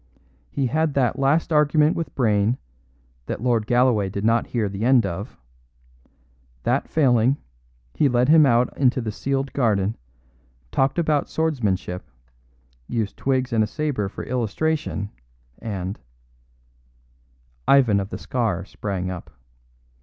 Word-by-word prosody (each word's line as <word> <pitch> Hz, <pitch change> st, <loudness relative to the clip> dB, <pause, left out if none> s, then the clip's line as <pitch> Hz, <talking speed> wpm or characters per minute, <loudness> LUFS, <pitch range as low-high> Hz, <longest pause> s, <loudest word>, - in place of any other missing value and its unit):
He 140 Hz, -, -1 dB
had 155 Hz, +3 st, 0 dB
that 135 Hz, 0 st, +1 dB
last 155 Hz, +4 st, +2 dB
argument 150 Hz, +1 st, +4 dB
with 165 Hz, -5 st, -4 dB
Brayne, 110 Hz, -1 st, +2 dB, 0.7 s
that -, -, -3 dB
Lord 115 Hz, -4 st, +1 dB
Galloway 120 Hz, -5 st, +3 dB
did 100 Hz, +2 st, -4 dB
not 115 Hz, +1 st, +2 dB
hear 115 Hz, -4 st, -1 dB
the 100 Hz, +2 st, -5 dB
end 125 Hz, -2 st, +4 dB
of; 85 Hz, -3 st, -5 dB, 1.3 s
that -, -, 0 dB
failing, 130 Hz, -3 st, +3 dB, 0.6 s
he 145 Hz, -, +2 dB
led 125 Hz, 0 st, +2 dB
him 155 Hz, +1 st, +7 dB
out 120 Hz, 0 st, +2 dB
into 130 Hz, -2 st, +2 dB
the 115 Hz, -3 st, -3 dB
sealed 135 Hz, +4 st, -2 dB
garden, 110 Hz, -5 st, +1 dB, 0.8 s
talked 135 Hz, +3 st, +1 dB
about 155 Hz, -4 st, +1 dB
swordsmanship, 105 Hz, -, -1 dB, 0.8 s
used 110 Hz, -3 st, -2 dB
twigs 130 Hz, -2 st, -1 dB
and 110 Hz, -1 st, +3 dB
a -, -, -1 dB
sabre 135 Hz, -7 st, -2 dB
for -, -, -7 dB
illustration, 125 Hz, -1 st, -2 dB, 0.5 s
and 100 Hz, -2 st, -5 dB, 0.8 s
" -, -, -37 dB
Ivan 125 Hz, -8 st, +5 dB
of 100 Hz, 0 st, -4 dB
the -, -, -5 dB
Scar 110 Hz, -8 st, -2 dB
sprang 95 Hz, -3 st, -4 dB
up. 90 Hz, -, -8 dB
120 Hz, 130 wpm, -23 LUFS, 100-135 Hz, 1.3 s, him